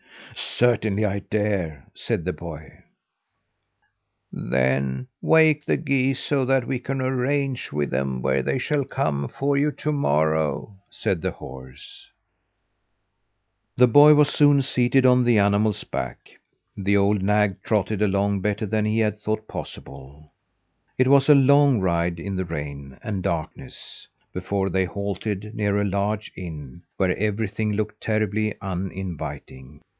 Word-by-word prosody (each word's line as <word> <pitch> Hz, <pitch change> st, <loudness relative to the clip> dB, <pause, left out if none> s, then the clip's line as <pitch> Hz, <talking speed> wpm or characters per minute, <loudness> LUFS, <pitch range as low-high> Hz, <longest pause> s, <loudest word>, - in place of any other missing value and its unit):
"Certainly 110 Hz, -3 st, +1 dB
I 100 Hz, -1 st, -1 dB
dare!" 100 Hz, -9 st, -2 dB
said 85 Hz, -, -3 dB
the 90 Hz, -, -1 dB
boy. 80 Hz, -3 st, -10 dB, 1.5 s
"Then 65 Hz, +1 st, -1 dB
wake 155 Hz, -2 st, +4 dB
the -, -, +1 dB
geese, 135 Hz, -3 st, 0 dB
so 140 Hz, -2 st, 0 dB
that 135 Hz, -1 st, +2 dB
we 130 Hz, 0 st, -2 dB
can 135 Hz, +1 st, -3 dB
arrange 130 Hz, +1 st, -1 dB
with 75 Hz, 0 st, -2 dB
them 65 Hz, -2 st, -2 dB
where 60 Hz, -, +1 dB
they -, -, -1 dB
shall 145 Hz, +2 st, 0 dB
come 70 Hz, -, -2 dB
for 140 Hz, -, -1 dB
you 150 Hz, +2 st, +2 dB
to 150 Hz, -, -3 dB
morrow," 80 Hz, -, 0 dB
said 100 Hz, -7 st, -2 dB
the -, -, -1 dB
horse. 65 Hz, 0 st, -12 dB, 1.7 s
The 125 Hz, 0 st, +6 dB
boy 145 Hz, +5 st, +8 dB
was 150 Hz, 0 st, +4 dB
soon 145 Hz, -1 st, +4 dB
seated 130 Hz, 0 st, +2 dB
on 125 Hz, 0 st, +5 dB
the 120 Hz, -2 st, +3 dB
animal's 100 Hz, +1 st, +2 dB
back. -, -, -6 dB, 0.4 s
The 100 Hz, 0 st, +1 dB
old 100 Hz, 0 st, +2 dB
nag 105 Hz, -1 st, +1 dB
trotted 105 Hz, -1 st, -1 dB
along 100 Hz, 0 st, +1 dB
better 105 Hz, +3 st, -1 dB
than 105 Hz, +1 st, 0 dB
he 110 Hz, +1 st, 0 dB
had 105 Hz, -2 st, 0 dB
thought 110 Hz, +1 st, -3 dB
possible. 70 Hz, +3 st, -10 dB, 0.7 s
It 130 Hz, 0 st, +3 dB
was 140 Hz, +1 st, +5 dB
a 150 Hz, -, +9 dB
long 140 Hz, -2 st, +5 dB
ride 85 Hz, -2 st, 0 dB
in 95 Hz, +3 st, -5 dB
the 95 Hz, 0 st, -2 dB
rain 70 Hz, -4 st, -7 dB
and 100 Hz, -4 st, -3 dB
darkness 85 Hz, -3 st, -6 dB, 0.3 s
before 95 Hz, +1 st, -2 dB
they 95 Hz, +1 st, +1 dB
halted 100 Hz, +2 st, -4 dB
near 105 Hz, -2 st, 0 dB
a -, -, +1 dB
large 100 Hz, +2 st, -2 dB
inn, 80 Hz, -4 st, -9 dB, 0.2 s
where 95 Hz, -2 st, +1 dB
everything 105 Hz, +1 st, -1 dB
looked 105 Hz, 0 st, -3 dB
terribly 110 Hz, -1 st, -1 dB
uninviting! 80 Hz, -7 st, -6 dB
100 Hz, 140 wpm, -23 LUFS, 85-125 Hz, 1.7 s, a